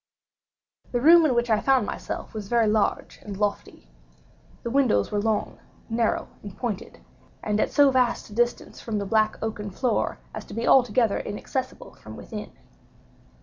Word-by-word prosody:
The 245 - 0
room 325 +4 +7
in 255 - +1
which 240 -1 +1
I 215 - +4
found 265 -5 +3
myself - - -6
was 215 -2 -6
very 235 +1 +3
large 215 -1 0
and 200 -2 -7
lofty. 205 - -3 0.8
The 235 - -3
windows 255 - +2
were 205 - 0
long, 220 -1 -1 0.3
narrow, 225 -1 0
and 200 -1 -10
pointed, 225 -5 -5 0.4
and 210 0 0
at - - +1
so 285 -2 +5
vast 250 -4 0
a - - -9
distance 240 +2 -1
from 225 -2 -3
the 200 - -2
black 215 +1 +1
oaken 210 -2 -4
floor 240 +6 -1 0.2
as - - -6
to - - -10
be 230 - -2
altogether 240 -4 +4
inaccessible 260 - -5
from - - -12
within. - - -8
225 Hz, 165 wpm, -25 LUFS, 210-250 Hz, 0.8 s, room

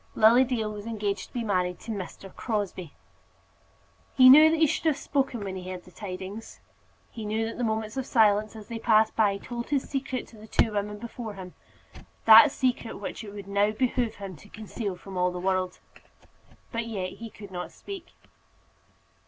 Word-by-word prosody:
Lily 230 +4 +6
Dale 235 -4 -2
was 210 +1 -8
engaged 210 -3 -2
to - - -30
be 240 - -2
married 180 -4 0
to 230 - -6
Mr. 195 -1 -7
Crosbie! 200 - -3 1.2
He 255 -1 +9
knew 305 +3 +9
that 325 - +1
he 320 - +6
should 305 - -1
have 310 -3 +3
spoken 270 -6 -1
when 190 -1 -5
he 185 0 -7
heard 180 -1 -6
the 180 - -17
tidings. 195 +3 -8 0.5
He 225 - -7
knew 215 +1 -1
that 225 - -6
the - - 0
moments 220 0 -2
of 265 - -3
silence 215 -2 +3
as 215 -2 -10
they 230 -1 -5
passed 220 -1 +3
by 205 -3 +3
told 235 +3 -6
his 280 -2 0
secret 270 -2 -3
to 225 - -16
the 215 - -12
two 220 - +2
women 210 0 -2
before 230 -1 -7
him, 185 -2 -9 0.7
that 225 +6 +10
secret 250 -4 -1
which 205 - -6
it 205 - -8
would 200 -1 -9
now 200 +1 +2
behove 235 0 0
him 195 -2 -8
to 205 - -17
conceal 215 -2 -5
from 190 +1 -9
all 180 0 +3
the 180 - -6
world. 185 0 -1 0.9
But 230 0 -3
yet 190 -5 -3
he 230 0 -7
could 205 -2 -12
not 180 -1 -5
speak. 390 -3 -9
215 Hz, 195 wpm, -27 LUFS, 200-235 Hz, 1.2 s, that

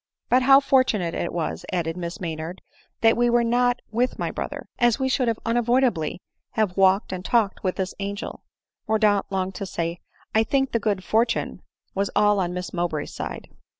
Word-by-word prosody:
" - - -59
But 250 +1 +5
how 270 +1 +7
fortunate 255 -11 +2
it 175 - -2
was," 170 -2 -3
added 165 -3 -1
Miss 170 -1 -5
Maynard, 165 +1 -5 0.4
"that 225 0 +5
we 240 0 +2
were 240 0 +3
not 245 +1 +1
with 245 +3 0
my - - -2
brother! - - -5
as 240 -2 +4
we 265 -1 0
should 255 -2 +1 0.2
un 230 +1 +1
avoidably 240 -9 +1 0.3
have 210 -5 0
walked 195 +1 +3
and 180 -1 -5
talked 215 -2 +1
with 185 -1 0
this 190 -1 -3
angel." 200 +1 -5 0.5
Mordaunt 210 -2 +2
longed 190 0 -1
to 190 +1 -5
say, 170 -1 -3 0.2
" - - -33
I 220 - +4
think 270 +3 0
the 230 - +1
good 200 -3 -1
fortune 230 +4 0 0.3
was 195 0 0
all 205 0 +4
on 180 -2 0
Miss 180 0 -5
Mowbray's 170 -4 -2
side." - - -6
205 Hz, 190 wpm, -24 LUFS, 180-240 Hz, 0.5 s, how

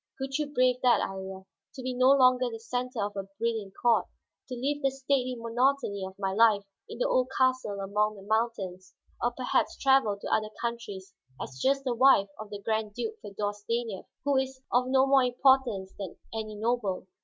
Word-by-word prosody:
Could 270 +1 -3
you 295 -1 -2
brave 255 -3 +3
that, 250 -1 +4
Iría, 190 0 -7 0.3
to 265 - -7
be 255 0 -2
no 255 +1 +4
longer 255 -2 +5
the 225 -1 -7
center 245 -1 -3
of 205 - -6
a 195 -1 -4
brilliant 220 -3 -2
court? 235 -2 +3 0.4
To 250 - -4
live 285 +4 -2
the 275 - +3
stately 265 -1 -1
monotony 235 -3 0
of 190 0 -7
my 195 -1 -2
life 215 -1 +4 0.3
in - - -7
the - - +1
old 255 - +2
castle 255 -6 +1
among 210 +2 0
the 195 - -12
mountains, 195 -4 -2 0.3
or 240 - +2
perhaps 250 +1 -1
travel 265 -7 +3
to - - -3
other 215 0 +1
countries 205 -5 -5 0.3
as 130 - -7
just 275 +1 +2
the 255 -2 0
wife 235 -5 +5
of 215 -1 -8
the 205 - -6
Grand 220 0 -2
Duke 445 0 -4
Feodor 205 +1 -3
Stanief, 220 0 -4 0.2
who 285 -1 +3
is 265 0 -1
of 250 +1 +2
no 265 0 +4
more 270 -1 +5
importance 245 -6 +2
than 195 -3 -6 0.2
any 215 -1 -4
noble? 215 -4 -1
235 Hz, 190 wpm, -28 LUFS, 205-260 Hz, 0.4 s, longer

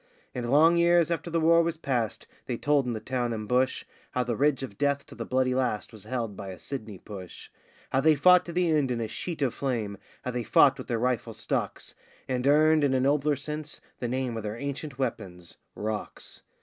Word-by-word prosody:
And 120 -1 -3
long 160 +5 +5
years 170 -1 +4
after 170 +1 -2
the 165 0 +1
war 165 +1 +5
was 165 -1 -1
past, 125 -8 -2 0.2
they 120 - -2
told 145 -1 +2
in 120 - -1
the 110 - -3
town 120 +1 -2
and 110 -1 -5
bush 130 +3 +1 0.3
How 125 - +1
the 120 -1 -2
ridge 140 +1 +2
of 100 -7 -8
death 140 0 +1
to - - -13
the - - -6
bloody 130 0 +1
last 125 -5 -1
was 105 -2 -10
held 115 -3 -3
by 100 0 -7
a 95 - -7
Sydney 110 -6 -6
push; 95 -2 -10 0.4
How 135 - +2
they 155 +1 +5
fought 180 +5 +6
to - - -4
the 175 -1 +1
end 150 -4 +2
in 120 -1 -1
a 115 - -2
sheet 160 +6 -4
of 125 - +1
flame, 115 -7 -2 0.3
how 125 - -1
they 125 0 -2
fought 135 +4 +5
with 130 - -7
their 120 - 0
rifle 125 0 -1
stocks, - - -3 0.3
And 125 0 -1
earned, 155 +1 +5
in 135 -2 +3
a - - +3
nobler 145 +2 +2
sense, 150 +2 -5 0.2
the 120 - -2
name 125 -1 -2
of - - -3
their 105 +1 -5
ancient 140 +1 -5
weapons 95 -9 -4 0.2
'rocks. 105 0 -5
130 Hz, 220 wpm, -27 LUFS, 115-150 Hz, 0.4 s, fought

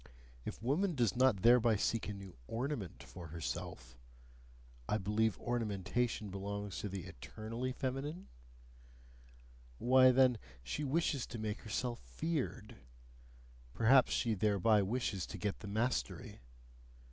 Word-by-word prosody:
If - - -6
woman 165 +8 +1
does 120 -7 +2
not 125 -6 +3
thereby 120 -1 +6
seek 110 +2 0
a - - -3
new 95 -2 -10
ORNAMENT 115 - -3
for 85 -3 -9
herself 65 -5 -6 0.9
I 105 - +2
believe 105 +1 +1
ornamentation 110 -1 -1
belongs 100 0 -4
to 105 - -3
the 95 -2 -5
eternally 110 - -5
feminine? 135 +7 -3 1.5
why, 130 - +6
then, 125 -2 +5 0.2
she 105 - -3
wishes 145 -2 0
to 115 - -6
make 110 -1 -3
herself 120 +3 -2
feared: 120 - -3 1.0
perhaps 125 +3 +5
she 115 - +1
thereby 105 +1 +3
wishes 100 -3 -1
to - - -7
get 105 -2 -2
the 100 - -8
mastery. 105 - -2
110 Hz, 125 wpm, -35 LUFS, 100-125 Hz, 1.5 s, thereby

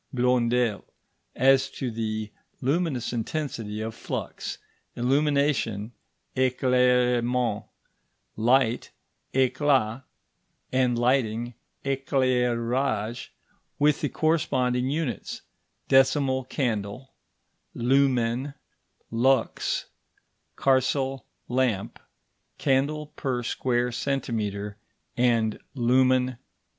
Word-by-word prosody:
Blondel 125 - +1 0.5
as 135 +1 +4
to 130 -3 -4
the 110 -1 -3 0.3
luminous 135 -3 0
intensity 115 -4 -3
of 110 +1 -4
flux, - - -5 0.4
illumination 135 -5 +1 0.4
(éclairement), 125 -3 +2 0.7
light 120 +1 +2 0.5
(éclat), 130 -3 +2 0.7
and 125 -2 +2
lighting 120 -1 +1 0.3
(éclairage), 125 -3 0 0.5
with 150 0 +3
the 145 - 0
corresponding 130 -6 +1
units, 145 -6 -3 0.4
decimal 135 -1 +3
candle, 120 -1 -3 0.6
lumen, 130 +1 +1 0.6
lux, 120 +1 +1 0.7
carcel 135 0 +1 0.2
lamp, 125 -6 0 0.6
candle 145 +2 0
per 125 -3 -2
square 125 0 0
centimetre, 110 -6 -2 0.4
and 115 -3 +2 0.2
lumen 130 +1 +3
hour. 130 - -9
125 Hz, 70 wpm, -26 LUFS, 115-135 Hz, 0.7 s, as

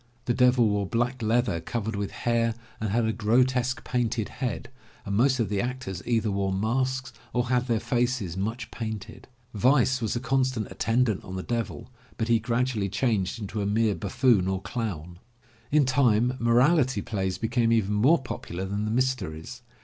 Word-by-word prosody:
The 120 - +1
Devil 125 -1 +4
wore 105 -2 0
black 120 +3 -1
leather 115 -5 +1
covered 110 +5 -3
with 100 -1 -2
hair 115 -1 0 0.2
and 110 - -2
had 115 +3 +1
a 110 - 0
grotesque 125 +3 +1
painted 120 -3 -1
head, 125 0 -4 0.3
and 100 - -2
most 130 +4 +3
of 115 - +1
the 100 0 -1
actors 125 -7 -4
either 115 -3 +1
wore 100 -1 0
masks 130 +6 -1 0.2
or 125 0 0
had 125 0 +1
their 115 -2 +1
faces 120 -5 -1
much 110 +5 -3
painted. 110 -3 -6 0.3
Vice 130 +3 +3
was 110 0 -1
a - - 0
constant 130 -3 0
attendant 115 -3 +1
on 95 - -7
the 95 - -4
Devil, 120 +1 -4 0.3
but 115 0 -2
he 115 -1 +4
gradually 115 -3 0
changed 105 0 0
into 105 0 -4
a 100 - -1
mere 110 +1 +2
buffoon 105 0 +2
or 95 0 0
clown. 90 -8 -4 0.5
In 150 -1 +4
time 125 -2 +3
moral 125 +8 +4
ity 130 -7 0
plays 95 -3 -2
became 115 0 +1
even 105 -3 +2
more 130 +11 +4
popular 95 -6 -5
than 100 +2 -2
the - - -1
mysteries. 125 -3 -2
115 Hz, 175 wpm, -26 LUFS, 105-125 Hz, 0.5 s, Devil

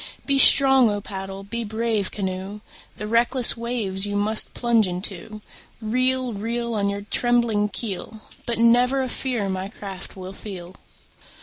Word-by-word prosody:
Be 275 -1 +2
strong, 265 -3 +8
O 205 0 -2
paddle! 195 -1 -7
be 235 +4 -4
brave, 220 -2 -2
canoe! 190 +1 -5 0.4
The 210 - -5
reckless 235 +3 +2
waves 225 -5 -2
you 205 - -4
must 210 +2 +1
plunge 235 -4 +2
into. 195 +3 -5 0.4
Reel, 255 +2 0
reel. 235 +3 -3
On 200 -2 0
your 200 0 -4
trembling 235 -4 +1
keel, 220 0 -5 0.3
But 235 -2 -2
never 245 +3 +3
a - - -3
fear 245 -5 -2
my 190 0 -3
craft 195 -3 -9
will 185 0 -8
feel. 185 -3 -9
215 Hz, 145 wpm, -23 LUFS, 195-235 Hz, 0.4 s, strong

